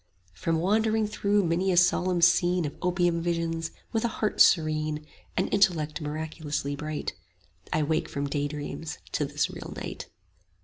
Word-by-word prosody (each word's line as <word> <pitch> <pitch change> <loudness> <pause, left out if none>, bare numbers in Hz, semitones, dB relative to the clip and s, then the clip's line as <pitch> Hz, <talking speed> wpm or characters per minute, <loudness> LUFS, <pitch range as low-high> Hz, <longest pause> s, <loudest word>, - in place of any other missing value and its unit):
From 160 - -1
wandering 215 +5 +2
through 205 -1 +1
many 175 +3 +1
a 175 - +1
solemn 180 0 +3
scene 175 0 +4
Of 150 - -3
opium 175 -2 +1
visions, 165 -1 -1 0.2
with 225 - 0
a - - +3
heart 215 -2 0
serene 155 -2 +3 0.3
And - - +2
intellect 165 -7 +2
miraculously 150 -1 -3
bright: 150 +1 -4 0.6
I 155 - +2
wake 160 +2 0
from 140 0 -2
daydreams 145 +2 -4
to - - 0
this - - -1
real - - -8
night. - - -6
165 Hz, 145 wpm, -27 LUFS, 155-180 Hz, 0.6 s, scene